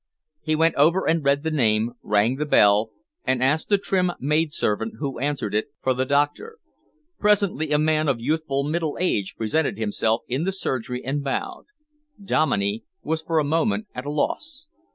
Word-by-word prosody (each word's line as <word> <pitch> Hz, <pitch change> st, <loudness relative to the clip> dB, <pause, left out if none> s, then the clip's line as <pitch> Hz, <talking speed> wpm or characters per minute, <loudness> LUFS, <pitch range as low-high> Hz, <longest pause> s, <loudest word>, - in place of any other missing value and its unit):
He 155 Hz, -1 st, 0 dB
went 165 Hz, +1 st, +3 dB
over 165 Hz, +6 st, +3 dB
and 165 Hz, -1 st, +2 dB
read 140 Hz, +1 st, +2 dB
the 160 Hz, -, -1 dB
name, 115 Hz, -5 st, +2 dB
rang 105 Hz, +5 st, +1 dB
the 150 Hz, -, -1 dB
bell, 105 Hz, -3 st, +4 dB, 0.3 s
and 130 Hz, -1 st, +1 dB
asked 150 Hz, +4 st, +1 dB
the 205 Hz, -, +5 dB
trim 185 Hz, -2 st, 0 dB
maidservant 145 Hz, -7 st, 0 dB
who 140 Hz, -4 st, -4 dB
answered 140 Hz, -6 st, -2 dB
it, 105 Hz, +1 st, 0 dB, 0.2 s
for 130 Hz, -, +2 dB
the 130 Hz, +1 st, -1 dB
doctor. 145 Hz, -, 0 dB, 0.6 s
Presently, 200 Hz, -7 st, +2 dB
a 150 Hz, -, +4 dB
man 155 Hz, 0 st, +2 dB
of 135 Hz, -4 st, +1 dB
youthful 140 Hz, +1 st, -1 dB
middle 155 Hz, +1 st, -2 dB
age 105 Hz, -, -1 dB
presented 115 Hz, +2 st, 0 dB
himself 110 Hz, +1 st, 0 dB
in 130 Hz, +5 st, -1 dB
the 190 Hz, -, 0 dB
surgery 125 Hz, -9 st, -3 dB
and 140 Hz, +2 st, -2 dB
bowed. 135 Hz, -, -3 dB, 0.5 s
Dominey 200 Hz, +3 st, 0 dB, 0.2 s
was 160 Hz, 0 st, -1 dB
for 160 Hz, 0 st, -1 dB
a 155 Hz, -, +4 dB
moment 165 Hz, +9 st, 0 dB
at 125 Hz, +3 st, -6 dB
a -, -, -2 dB
loss. 285 Hz, -, -2 dB
145 Hz, 175 wpm, -23 LUFS, 125-165 Hz, 0.6 s, the